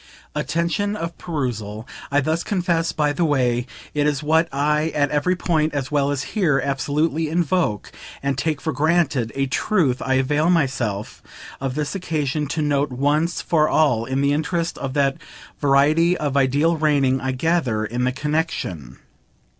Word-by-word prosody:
(Attention 170 +8 -1
of 170 -4 -5
perusal, 120 - -4 0.2
I 145 +1 +2
thus 160 +4 -1
confess 175 -4 0
by 150 -1 0
the 170 - 0
way, 125 -5 +1 0.3
is 145 -1 0
what 160 +2 +2
I 150 +3 +1
at 145 -1 +1
every 150 +5 +1
point, 160 -4 0
as 135 -2 -3
well 140 -1 +2
as 140 -1 -1
here, 165 -10 +2
absolutely 150 +4 0
invoke 165 - 0 0.3
and 140 0 0
take 150 +2 -1
for 160 - -2
granted; 145 -5 +1
a 135 0 +1
truth 135 - +1
I 130 - +1
avail 145 +5 +2
myself 130 - -1 0.4
of 135 -1 -3
this 150 -1 -2
occasion 155 -5 -2
to 155 +2 -2
note 145 0 +1
once 145 +6 0
for 155 -2 +2
all 125 -8 +2
in 130 +2 -1
the 140 0 +2
interest 165 +3 -1
of 135 0 -4
that 140 -1 +2 0.4
variety 150 +5 +3
of 145 -2 -2
ideal 140 +5 +2
reigning, 140 -4 +2
I 130 - -1
gather, 130 -6 0
in 120 +3 -2
the 130 - +2
connexion. 135 - -3
145 Hz, 160 wpm, -22 LUFS, 135-160 Hz, 0.4 s, variety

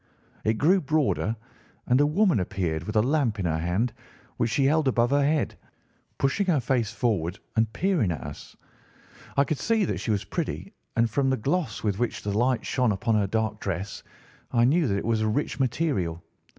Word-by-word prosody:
It 110 - +2
grew 180 - +3
broader, 145 -7 +1 0.5
and 125 +3 +3
a 145 - +4
woman 180 - +3
appeared 85 -3 -2
with 105 - -5
a 110 - +4
lamp 130 -5 +1
in 95 - -2
her 80 -1 0
hand, 95 +8 0 0.4
which 115 - +1
she 135 +5 +2
held 155 +1 +3
above 120 -1 +2
her 145 0 +4
head, 150 +1 +1 0.6
pushing 165 +9 +1
her 165 -6 +3
face 120 -3 0
forward 95 -7 -1 0.2
and 110 -1 +2
peering 155 - +1
at 75 - -4
us. - - -9 0.8
I 140 - +6
could 145 +1 -2
see 225 -3 +2
that - - -2
she - - -5
was 105 -2 +1
pretty, - - -4 0.2
and 115 0 +3
from 135 +4 +1
the 130 - +1
gloss 160 +9 -1
with 105 -2 0
which 120 - -2
the 100 -1 -2
light 125 +2 +1
shone 125 -4 +1
upon 110 +4 0
her 105 -2 +2
dark 110 +1 -1
dress 95 +1 -4 0.5
I 120 - +3
knew 155 +4 +3
that 100 -3 0
it - - -3
was 115 -1 +1
a 110 - +1
rich 140 +5 -1
material. 120 - 0
120 Hz, 200 wpm, -26 LUFS, 105-145 Hz, 0.8 s, I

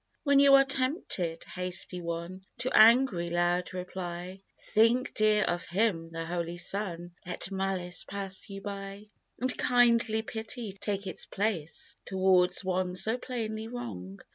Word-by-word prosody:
"When 280 -2 +5
you 280 0 +8
are 275 0 +6
tempted, 255 - -1
hasty 180 0 -3
one, 170 +2 -5
To 255 - -1
angry, 220 -6 +6
loud 175 +1 +1
reply, 180 0 -6 0.3
Think, 230 +4 +3
dear, 215 -1 +3
of 175 0 -1
Him, 175 -3 0
the 165 0 -5
Holy 170 0 -3
Son, 175 -2 -3
Let 180 +2 -4
malice 190 -2 -2
pass 195 -1 -5
you 195 0 -7
by, 200 +1 -7 0.3
"And 255 +1 0
kindly 235 -2 +3
pity 220 0 -5
take 200 +1 -4
its 185 - -3
place, 195 -7 -2
Towards 185 -1 +3
one 185 -1 -1
so 220 +6 0
plainly 220 -4 -4
wrong. 100 - -7
195 Hz, 140 wpm, -29 LUFS, 175-220 Hz, 0.3 s, you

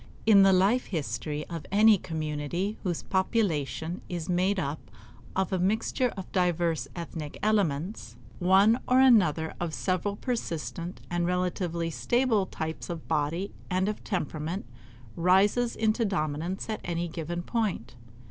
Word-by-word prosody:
In 210 -3 +7
the 195 0 +7
life 195 +7 +3
history 150 -3 -3
of 165 -3 -6
any 210 0 +6
community 160 +5 -3
whose 175 -4 -2
population 175 - -1
is 175 -3 -4
made 185 +2 +1
up 150 -2 -4 0.5
of 190 -1 0
a 185 - +1
mixture 220 +6 +1
of 190 - -7
divers 175 -3 +1
ethnic 165 -3 -6
elements, 185 - 0 0.2
one 195 +6 +5
or 255 +1 +5
another 180 - +4
of 170 -2 -2
several 190 +2 -1
persistent 170 - -4
and 175 0 0
relatively 175 -2 -1
stable 215 - +1
types 160 0 -5
of 170 -2 -6
body 160 +5 -1 0.2
and 185 +1 +1
of 210 - -3
temperament 170 -1 -3 0.5
rises 195 +7 +3
into 220 +1 +1
dominance 170 -1 -2
at 215 -1 -3
any 175 0 -2
given 170 +1 -4
point. 200 - -2
180 Hz, 135 wpm, -28 LUFS, 160-205 Hz, 0.5 s, In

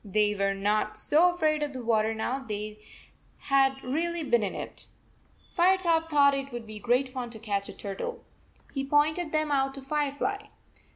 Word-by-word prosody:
They 210 0 +2
were 195 -1 0
not 210 +2 0
so 320 +10 +4
afraid 310 -3 +1
of 295 -1 -2
the 255 -2 -6
water 220 -1 +2
now 245 +4 -2
they 215 -4 -5 0.6
had 270 -1 +2
really 330 +5 -1
been 240 -5 +2
in 200 -3 -2
it. - - -7 0.7
Firetop 345 -3 +3
thought 285 -2 +5
it 275 0 -3
would 240 -1 -6
be 215 -1 -9
great 245 +4 +2
fun 255 -2 -5
to 230 - -10
catch 205 -3 -3
a - - -7
turtle. 340 - -6 0.5
He 270 - -2
pointed 305 +4 +2
them 310 -1 0
out 270 -1 +1
to 275 - -7
Firefly. 295 +9 -2
270 Hz, 175 wpm, -28 LUFS, 215-305 Hz, 0.7 s, thought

